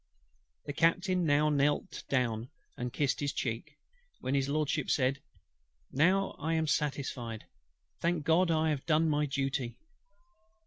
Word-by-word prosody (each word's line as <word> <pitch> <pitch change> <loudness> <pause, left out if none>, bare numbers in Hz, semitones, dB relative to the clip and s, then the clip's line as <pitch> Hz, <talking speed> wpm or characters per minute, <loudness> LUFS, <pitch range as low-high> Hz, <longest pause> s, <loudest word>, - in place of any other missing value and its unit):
The 145 - -4
Captain 180 +3 +2
now 150 0 +3
knelt 145 0 0
down, 120 -3 0 0.3
and 125 0 -4
kissed 140 0 0
his 145 -1 -1
cheek; 130 +5 -4 0.4
when 130 - -2
HIS 135 -1 +1
LORDSHIP 150 -1 0
said, 135 +1 +1 0.7
"Now 185 +8 +3
I 160 +3 0
am 160 0 +1
satisfied. 135 -7 -2 0.5
Thank 170 -3 0
GOD, 170 +2 +4
I 160 -1 +2
have 140 -3 -3
done 160 0 +3
my 150 -1 +1
duty." 135 -2 -2
145 Hz, 135 wpm, -31 LUFS, 135-160 Hz, 0.7 s, GOD